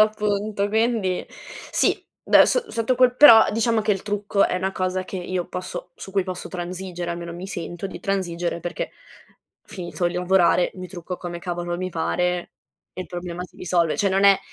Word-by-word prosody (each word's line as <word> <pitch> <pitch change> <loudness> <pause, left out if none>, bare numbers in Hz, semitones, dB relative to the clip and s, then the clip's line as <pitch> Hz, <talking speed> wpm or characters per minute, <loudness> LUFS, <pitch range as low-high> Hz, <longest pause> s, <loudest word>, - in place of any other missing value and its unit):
appunto 210 -1 +1
quindi 220 -4 +1 0.5
sì, - - +2 0.2
da - - +7
so 480 -3 0
sotto 230 +2 0
quel 250 -1 +4
però, 230 -7 +9
diciamo 230 0 +2
che 210 0 +2
il 195 - -3
trucco 205 -1 +1
è - - -1
una 190 +1 -1
cosa 185 0 -1
che 190 - -6
io 180 0 -3
posso 180 -1 -6
su 195 - -10
cui 195 -1 +1
posso 185 -1 -5
transigere, 180 -1 -5
almeno, 170 0 -5
mi 180 +2 -7
sento 175 -1 -5
di - - -9
transigere 175 -3 -2
perché 175 - -4 0.7
finito 175 -1 -3
di 175 - -7
lavorare, 180 -1 +3
mi 185 -1 -8
trucco 180 -1 -6
come 175 -1 -6
cavolo 175 0 -3
mi 185 +1 -3
pare 180 +2 -1 0.4
e 185 - -7
il - - -12
problema 175 0 -6
si - - -17
risolve. 170 -2 +1
Cioè, 200 - +2
non 195 +1 +2
è 200 -1 +7
185 Hz, 185 wpm, -23 LUFS, 175-200 Hz, 0.7 s, però